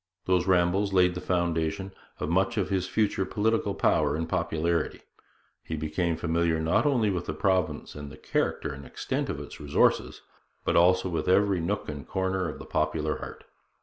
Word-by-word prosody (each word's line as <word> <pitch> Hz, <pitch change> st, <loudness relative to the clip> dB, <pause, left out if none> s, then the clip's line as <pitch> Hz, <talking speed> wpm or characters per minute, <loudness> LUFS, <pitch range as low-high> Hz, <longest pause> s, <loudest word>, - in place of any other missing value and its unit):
Those 90 Hz, 0 st, +2 dB
rambles 95 Hz, +2 st, +2 dB
laid 90 Hz, -1 st, +4 dB
the 90 Hz, -, -5 dB
foundation 85 Hz, +1 st, -1 dB, 0.3 s
of -, -, -2 dB
much 95 Hz, +7 st, +1 dB
of 100 Hz, -3 st, 0 dB
his 95 Hz, -2 st, 0 dB
future 105 Hz, -1 st, +1 dB
political 105 Hz, 0 st, 0 dB
power 75 Hz, -1 st, +2 dB
and 80 Hz, +1 st, -2 dB
popularity. 80 Hz, +1 st, -1 dB, 0.6 s
He 80 Hz, -, -5 dB
became 80 Hz, +2 st, -1 dB
familiar 85 Hz, 0 st, +1 dB
not 80 Hz, -, +2 dB
only 120 Hz, -7 st, +2 dB
with 90 Hz, -2 st, -3 dB
the 80 Hz, -, -3 dB
province 95 Hz, +1 st, 0 dB
and 75 Hz, -1 st, -8 dB
the 75 Hz, -, -11 dB
character 75 Hz, -, -1 dB
and 70 Hz, 0 st, -9 dB
extent -, -, -3 dB
of -, -, -3 dB
its -, -, -9 dB
resources, 75 Hz, -1 st, +1 dB, 0.4 s
but -, -, +1 dB
also 90 Hz, +2 st, +4 dB
with 85 Hz, -1 st, -2 dB
every 100 Hz, 0 st, +4 dB
nook 100 Hz, +5 st, -2 dB
and 75 Hz, -3 st, -6 dB
corner 95 Hz, -2 st, -1 dB
of 75 Hz, -, -7 dB
the -, -, -10 dB
popular 75 Hz, 0 st, -1 dB
heart. -, -, -8 dB
90 Hz, 180 wpm, -27 LUFS, 80-95 Hz, 0.6 s, laid